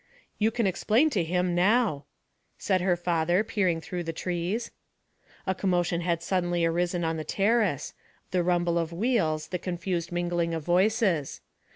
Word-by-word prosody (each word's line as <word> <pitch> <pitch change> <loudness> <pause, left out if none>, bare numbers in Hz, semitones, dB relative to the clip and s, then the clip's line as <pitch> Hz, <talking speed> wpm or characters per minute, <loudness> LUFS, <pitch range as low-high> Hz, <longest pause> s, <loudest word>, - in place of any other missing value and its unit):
'You 215 +1 +3
can 230 0 -1
explain 225 - +2
to 195 -9 +1
him 180 +2 0
now,' 185 - +2 0.5
said 185 -2 0
her 180 -1 +2
father, 175 +2 +1
peering 190 -7 0
through 175 +2 -5
the 165 -1 -3
trees. 180 +7 -3 0.7
A 190 - +1
commotion 175 -2 0
had 170 -1 -1
suddenly 175 -2 0
arisen 175 +1 0
on 160 0 -1
the 155 - -3
terrace 200 - +1 0.4
the 180 - +2
rumble 175 -1 +1
of 165 -1 -2
wheels, 170 -6 0
the 180 - -3
confused 175 -1 -3
mingling 175 -1 -1
of 160 -2 -5
voices. 185 - +1
175 Hz, 155 wpm, -27 LUFS, 170-195 Hz, 0.7 s, You